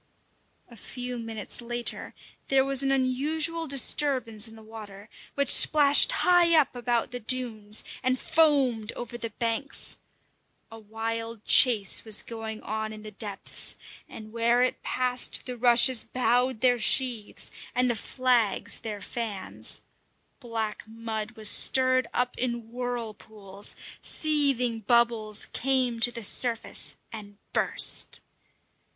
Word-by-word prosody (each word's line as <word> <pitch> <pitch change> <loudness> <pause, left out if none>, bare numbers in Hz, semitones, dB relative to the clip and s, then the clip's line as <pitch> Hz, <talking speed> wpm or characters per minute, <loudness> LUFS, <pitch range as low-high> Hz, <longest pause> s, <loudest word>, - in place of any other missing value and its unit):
A 235 - -16
few 245 +2 -7
minutes 225 -1 -5
later 240 0 -2 0.3
there 270 -1 +2
was 275 -1 +2
an 270 0 0
unusual 305 +6 0
disturbance 255 -5 +2
in 225 - -14
the 220 - -15
water, 215 -2 -12 0.3
which 280 -2 +4
splashed 290 -2 +6
high 345 -2 +3
up 280 -3 -1
about 240 -1 -2
the 245 - -5
dunes 220 -3 -1 0.2
and 255 0 0
foamed 275 -9 +1
over 240 0 -8
the 235 -1 -5
banks. 230 +4 -3 0.7
A 225 - -11
wild 225 +1 -6
chase 225 -7 +4
was 220 -2 0
going 225 -3 -8
on 220 +1 -4
in 215 0 -11
the 215 - -9
depths, 205 0 -4 0.3
and 215 -1 -11
where 235 +2 +1
it 255 - -2
passed 250 0 -1
the 250 - -6
rushes 240 0 +5
bowed 250 -1 0
their 245 -1 +3
sheaves 235 -1 +2 0.2
and 250 0 +2
the 240 - 0
flags 240 -2 0
their 210 -2 -7
fans. 220 -5 -2 0.6
Black 225 -4 -5
mud 225 0 -6
was 215 -1 +1
stirred 255 +4 +3
up 250 0 -2
in 235 -2 -3
whirlpools; 220 -5 -4 0.3
seething 275 -7 0
bubbles 225 -1 +1
came 255 -3 -1
to 240 +1 +4
the 235 -1 -6
surface 230 +2 0 0.2
and 205 -2 -10 0.2
burst. - - +2
235 Hz, 130 wpm, -26 LUFS, 220-255 Hz, 0.7 s, splashed